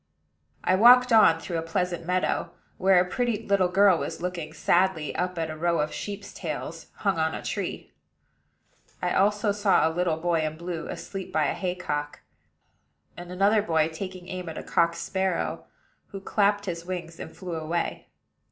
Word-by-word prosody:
I - - +2
walked 245 +5 +7
on 165 -7 +6
through 165 0 -3
a - - -2
pleasant 170 +1 -2
meadow, 180 0 0 0.3
where 190 -1 +5
a 180 - +2
pretty 225 +1 -1
little 195 -2 +3
girl 190 -1 +4
was - - -4
looking 175 -2 -4
sadly 175 -4 +1
up 180 0 -2
at 160 -1 -2
a - - -6
row 170 +1 0
of 150 +1 -1
sheep's 205 0 -6
tails - - -6 0.2
hung - - +2
on - - 0
a - - -6
tree. - - -4 1.1
I - - -1
also 205 +2 +2
saw 200 -4 +3
a 160 - -2
little 170 -2 0
boy 170 0 +1
in 155 0 -3
blue, 170 -1 -5
asleep 195 -2 -6
by 155 -1 +2
a - - 0
haycock; 180 -6 -3 0.9
and 175 0 -9
another 200 +4 +3
boy 160 -5 +1
taking 185 +2 -7
aim 180 -2 -5
at 160 - -7
a - - -5
cock 170 0 +2
sparrow, 190 -1 -2 0.4
who 195 - -8
clapped 205 +1 +1
his 170 -3 -4
wings 175 -2 -6
and - - -9
flew 180 -2 -6
away. 160 +2 -3
180 Hz, 175 wpm, -26 LUFS, 165-195 Hz, 1.1 s, walked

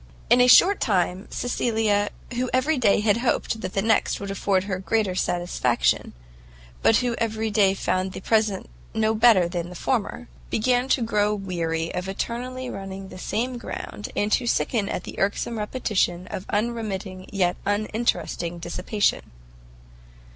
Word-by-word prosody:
In 250 - +7
a 250 - +6
short 370 +10 +7
time 185 -1 0
Cecilia, 220 -4 0 0.2
who 250 +1 -1
every 270 +3 +1
day 210 -4 +4
had 210 0 +3
hoped 235 -2 0
that 185 - -5
the 195 - +1
next 220 -1 +2
would 200 -1 -5
afford 195 -1 +1
her 190 -2 -3
greater 205 0 0
satisfaction, 175 -9 0 0.7
but 225 - +5
who 240 - 0
every 220 -1 -1
day 200 -2 +4
found 185 0 -1
the - - -6
present 215 -1 +1 0.3
no 220 0 +2
better 220 -5 +5
than 175 0 -4
the 180 - -10
former, 245 +3 -2 0.2
began 245 +3 +1
to 255 - +2
grow 210 -2 +1
weary 165 -4 -2
of 180 +1 -3
eternally 250 +5 -4
running 195 -3 -7
the 185 - -10
same 245 +6 -2
round, 205 - -6
and 205 +1 0
to 240 - +2
sicken 220 -3 0
at 180 - -3
the - - -8
irksome 205 +3 -1
repetition 210 -5 -1
of 185 - -5
unremitting 205 -4 -3
yet 180 -3 +1
uninteresting 205 -5 -1
dissipation. 180 +5 0
205 Hz, 155 wpm, -24 LUFS, 185-230 Hz, 0.7 s, In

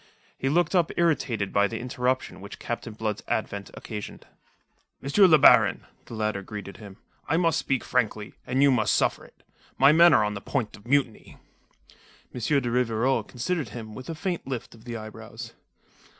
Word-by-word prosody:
He 135 - -2
looked 170 +4 +1
up 175 -4 +2
irritated 130 - 0
by 100 0 +3
the 115 - -5
interruption 125 -2 -2
which 100 +2 -9
Captain 120 -1 -5
Blood's 105 -1 -3
advent 100 -2 -3
occasioned. 105 -3 -8 0.8
"M. 135 - -4
le 185 -6 +7
Baron," 125 -6 +5 0.2
the 115 - -9
latter 110 -2 -1
greeted 100 0 -8
him. 100 -3 -12 0.3
"I 160 - +2
must 165 -2 +2
speak 135 -2 -1
frankly; 110 -4 -1
and 130 +2 +2
you 140 - +6
must 110 -5 +2
suffer - - 0
it. - - -22 0.3
My 140 +2 +6
men 170 +2 +7
are - - +4
on 105 0 -1
the 100 - -6
point 125 -6 -3
of 105 - -17
mutiny." 135 -4 0 1.0
M. 125 - -6 0.2
de 120 -2 -3
Rivarol 125 +1 +1
considered 135 +2 -3
him 110 0 -8
with 130 +6 -9
a 165 - -4
faint 175 -1 -4
lift 125 -3 -5
of 115 0 -17
the 120 -1 -5
eyebrows. 110 -1 -9
120 Hz, 180 wpm, -26 LUFS, 110-140 Hz, 1.0 s, le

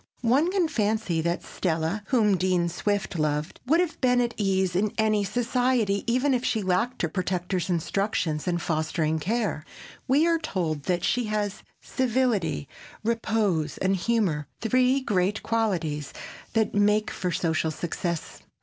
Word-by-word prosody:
One 275 +9 +4
can 375 -4 +2
fancy 215 - 0
that 170 +2 -1
Stella, 165 +3 -2
whom 215 -6 +3
Dean 180 -2 +1
Swift 195 0 -2
loved, 150 +1 -1
would 320 +5 +4
have 355 -2 -1
been 250 -1 +4
at 240 -1 0
ease 190 -3 +1
in 205 +3 +1
any 215 -1 +2
society, 235 -1 +1
even 260 +3 +2
had 250 -1 0
she 220 -4 0
lacked 185 +6 0
her - - +3
protector's 180 +1 -2
instruction 175 -2 0
and 175 -1 +1
fostering 160 -1 0
care. 210 -3 -1 0.4
We 280 +5 +4
are 335 -1 +2
told 165 - -2
that 175 -1 0
she 245 +4 +1
has 210 -2 -2 0.2
civility, 230 - 0 0.4
repose 215 -9 0
and 190 +1 +1
humor, 185 -8 0
three 255 +3 +2
great 205 -4 0
qualities 175 -10 -1 0.4
that 220 -2 +1
make 210 +1 +2
for 180 -1 -2
social 160 -2 0
success. 170 +1 -4
200 Hz, 145 wpm, -26 LUFS, 170-235 Hz, 0.4 s, One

